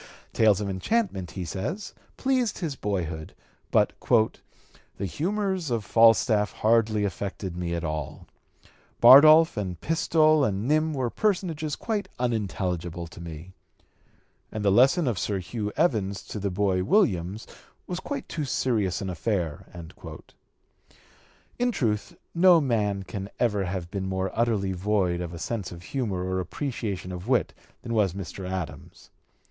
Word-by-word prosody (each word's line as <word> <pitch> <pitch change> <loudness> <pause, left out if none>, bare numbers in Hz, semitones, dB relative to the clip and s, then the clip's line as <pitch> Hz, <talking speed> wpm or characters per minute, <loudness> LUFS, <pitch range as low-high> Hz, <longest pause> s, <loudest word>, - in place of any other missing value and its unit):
Tales 105 -3 +4
of 105 - -3
enchantment, 95 - -1
he 90 +4 -5
says, 115 - -4 0.2
pleased 260 -4 0
his 160 -7 -3
boyhood, 85 -8 -4 0.3
but - - +3 1.0
"the 100 - -3
humors 190 - -2
of 115 -4 -1
Falstaff 115 -1 +4
hardly 110 -1 +2
affected 95 -2 -4
me 85 -1 -3
at 85 - -3
all. 75 -2 -4 0.7
Bardolph 155 +5 +8
and 90 -5 -3
Pistol 155 -1 +3
and 105 -1 -1
Nym 155 +1 +2
were 125 -3 -1
personages 170 -7 -1
quite 210 -4 -3
unintelligible 90 -7 -2
to 85 - -12
me; 85 +2 -9 1.0
and 110 -1 -4
the 100 - +5
lesson 135 - +4
of 115 -6 0
Sir 100 - -1
Hugh 105 +3 -4
Evans 105 - +1
to 105 - -6
the 100 0 -1
boy 95 -1 0
Williams 100 - +1 0.4
was 180 0 -4
quite 280 +7 -5
too 155 - -3
serious 115 -8 0
an 95 - -3
affair." 90 -4 -2 1.9
In 245 0 +2
truth, 105 - -1 0.2
no 175 0 +6
man 105 -8 0
can 100 0 -6
ever 105 -5 +1
have 90 -1 -4
been 95 -1 -3
more 95 0 -2
utterly 110 -5 0
void 95 -2 0
of 85 -2 -5
a 85 - -7
sense 100 +2 -4
of 85 0 -10
humor 105 -6 -2
or 95 0 -2
an - - 0
appreciation 100 - -4
of 90 +3 -7
wit 125 -1 +1 0.3
than 115 - -4
was 105 -6 +2
Mr. 95 -1 -6
Adams. 85 -6 -7
105 Hz, 145 wpm, -26 LUFS, 95-140 Hz, 1.9 s, Bardolph